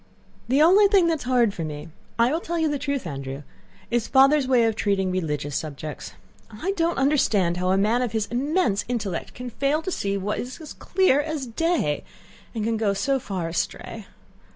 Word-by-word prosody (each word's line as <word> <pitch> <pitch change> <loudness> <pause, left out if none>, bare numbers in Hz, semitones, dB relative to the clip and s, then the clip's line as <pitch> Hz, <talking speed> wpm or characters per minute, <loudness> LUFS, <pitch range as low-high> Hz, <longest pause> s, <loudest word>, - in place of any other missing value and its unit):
"The 275 +4 +4
only 390 +5 +6
thing 390 -3 +4
that 325 -2 0
is - - -7
hard 245 -4 +2
for 170 - -5
me... 150 +1 -6 0.3
I 235 +2 +3
will 320 - 0
tell 340 0 -4
you 320 -1 +2
the 290 -2 -1
truth, 280 -5 -2
Andrew... 140 -2 -6 0.5
is 235 -2 0
Father's 275 +1 +4
way 250 -3 +4
of 225 -1 +1
treating 195 -3 0
religious 150 -5 -2
subjects. 150 - -6 0.4
I 235 - -3
don't 340 -3 0
understand 220 - +2
how 180 +1 0
a 190 - +3
man 215 +5 +2
of 245 -3 -1
his 220 -2 -1
immense 250 - +1
intellect 210 -8 -3
can 250 0 -7
fail 280 +6 0
to 375 - -3
see 200 - -1
what 200 +2 -2
is 255 +5 -6
as 315 - -9
clear 370 -7 +2
as 305 -2 -4
day, 250 - 0 0.5
and 220 - -2
can 225 +1 0
go 205 -2 +1
so 265 +7 0
far 190 -9 -4
astray. 165 +1 -4
235 Hz, 200 wpm, -24 LUFS, 190-290 Hz, 0.5 s, only